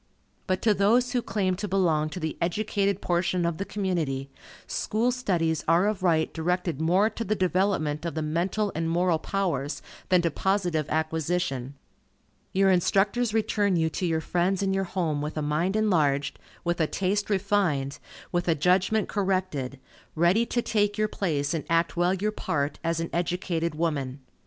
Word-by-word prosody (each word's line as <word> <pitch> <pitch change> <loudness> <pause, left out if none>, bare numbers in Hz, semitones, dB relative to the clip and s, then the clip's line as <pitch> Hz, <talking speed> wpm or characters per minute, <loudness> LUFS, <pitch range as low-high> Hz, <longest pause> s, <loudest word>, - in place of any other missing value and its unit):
But 185 0 -1
to 220 - +5
those 230 +6 +3
who 245 -1 +1
claim 195 -4 0
to 205 +2 -3
belong 165 -5 +1
to 170 - -6
the 160 -2 -3
educated 200 +2 0
portion 175 0 +1
of 170 0 -1
the 195 - -2
community, 160 -11 -2 0.3
school 230 +4 0
studies 170 - 0
are 170 +4 +4
of 210 -3 -1
right 165 -3 +2
directed 170 -2 -1
more 180 +6 +3
to 230 - -4
the 215 0 0
development 185 -5 0
of 170 -1 -4
the 160 - -1
mental 180 +7 0
and 165 +1 -1
moral 170 -1 +2
powers, 155 -8 -2 0.3
than 180 -2 +4
to 170 - +1
positive 175 -4 0
acquisition. 155 -4 -1 0.8
Your 195 0 +4
instructors 200 +6 +2
return 210 -3 +1
you 160 -1 +1
to 180 - -2
your 160 -1 0
friends 180 +4 0
and 195 0 +1
your 195 0 0
home 170 -5 -1
with 150 +1 -4
a 155 - -1
mind 160 +7 0
enlarged, 150 -10 +1 0.2
with 175 0 0
a 160 - +3
taste 200 +4 -1
refined, 190 -9 0 0.3
with 175 0 -1
a 165 - +3
judgment 185 +7 +2
corrected, 185 -10 -1 0.4
ready 180 +8 +3
to 240 - -1
take 205 -1 +1
your 215 0 +2
place 150 -8 -1
and 160 - -2
act 165 0 +2
well 175 +2 +2
your 210 +3 -1
part, 145 -8 -2
as 165 0 0
an 165 - -3
educated 170 -1 -1
woman. 145 -5 -2
175 Hz, 170 wpm, -26 LUFS, 160-195 Hz, 0.8 s, to